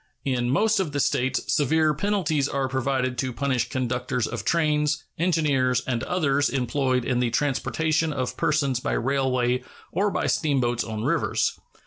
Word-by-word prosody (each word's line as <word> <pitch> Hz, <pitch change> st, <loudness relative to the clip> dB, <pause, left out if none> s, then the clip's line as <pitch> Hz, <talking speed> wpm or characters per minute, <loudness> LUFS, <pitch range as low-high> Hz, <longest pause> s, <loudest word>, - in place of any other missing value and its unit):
In 125 Hz, -3 st, 0 dB
most 215 Hz, -, +2 dB
of 165 Hz, -6 st, -2 dB
the 145 Hz, -, -1 dB
States 130 Hz, -1 st, +1 dB
severe 155 Hz, +2 st, +3 dB
penalties 160 Hz, -5 st, 0 dB
are 135 Hz, -1 st, -1 dB
provided 130 Hz, -1 st, -1 dB
to 130 Hz, -1 st, -1 dB
punish 130 Hz, -1 st, -1 dB
conductors 125 Hz, -1 st, -1 dB
of 115 Hz, -4 st, -4 dB
trains, 150 Hz, +1 st, +1 dB, 0.2 s
engineers, 145 Hz, -8 st, +2 dB
and 120 Hz, -3 st, -1 dB
others 145 Hz, -5 st, +1 dB
employed 130 Hz, -1 st, 0 dB
in 125 Hz, -2 st, 0 dB
the 125 Hz, -1 st, +1 dB
transportation 155 Hz, +4 st, 0 dB
of 130 Hz, -3 st, -3 dB
persons 140 Hz, -5 st, +1 dB
by -, -, -2 dB
railway 130 Hz, -1 st, +1 dB, 0.3 s
or 205 Hz, +2 st, +1 dB
by -, -, -1 dB
steamboats 125 Hz, -6 st, +1 dB
on 110 Hz, -1 st, -5 dB
rivers. 160 Hz, +7 st, +1 dB
135 Hz, 150 wpm, -25 LUFS, 125-150 Hz, 0.3 s, severe